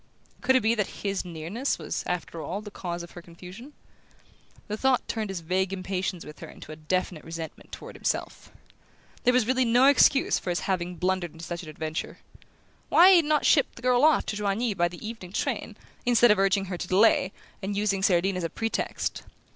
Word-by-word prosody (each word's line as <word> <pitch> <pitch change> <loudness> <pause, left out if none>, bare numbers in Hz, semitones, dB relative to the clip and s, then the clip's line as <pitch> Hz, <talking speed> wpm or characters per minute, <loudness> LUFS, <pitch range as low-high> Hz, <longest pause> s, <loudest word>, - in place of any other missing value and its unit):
Could 260 +1 +3
it 260 - +4
be 220 +1 +3
that 210 -4 -3
his 195 -1 -1
nearness 180 - -3
was, - - -4
after 170 -2 -4
all, 190 +5 -4
the 210 -1 -9
cause 175 -3 -5
of 170 - -11
her 175 - -10
confusion? 180 - -12 1.0
The 210 - -3
thought 260 +3 +1
turned 220 -3 -3
his 190 -3 -4
vague 185 +3 0
impatience 185 -1 -3
with 150 - -11
her - - -8
into - - -11
a - - -7
definite 160 +1 -2
resentment 165 0 -8
toward - - -9
himself. - - -3 0.7
There 250 - +6
was 250 -3 +3
really 260 +2 +2
no 245 +2 +4
excuse 275 0 +5
for - - -6
his 175 - -1
having 180 -2 -2
blundered 180 -1 -1
into 165 +1 -9
such 170 0 -5
an 160 - -10
adventure. 155 +1 -5 0.7
Why 360 +2 +7
had 385 - +8
he - - +6
not 300 -2 +2
shipped 280 - +3
the 235 - -13
girl 250 +1 +3
off 310 0 +4
to - - -3
Joigny 210 +2 0
by 175 -2 +1
the 175 +5 -8
evening 205 -5 -8
train, - - -3 0.3
instead 240 -2 +5
of 210 - +3
urging 195 0 +2
her 180 -2 -5
to - - -4
delay, 190 0 +4 0.3
and 200 +1 -3
using 205 -2 0
Cerdine 190 0 +2
as 180 - -3
a 165 - -1
pretext? 225 +7 -3
195 Hz, 205 wpm, -27 LUFS, 175-230 Hz, 1.0 s, had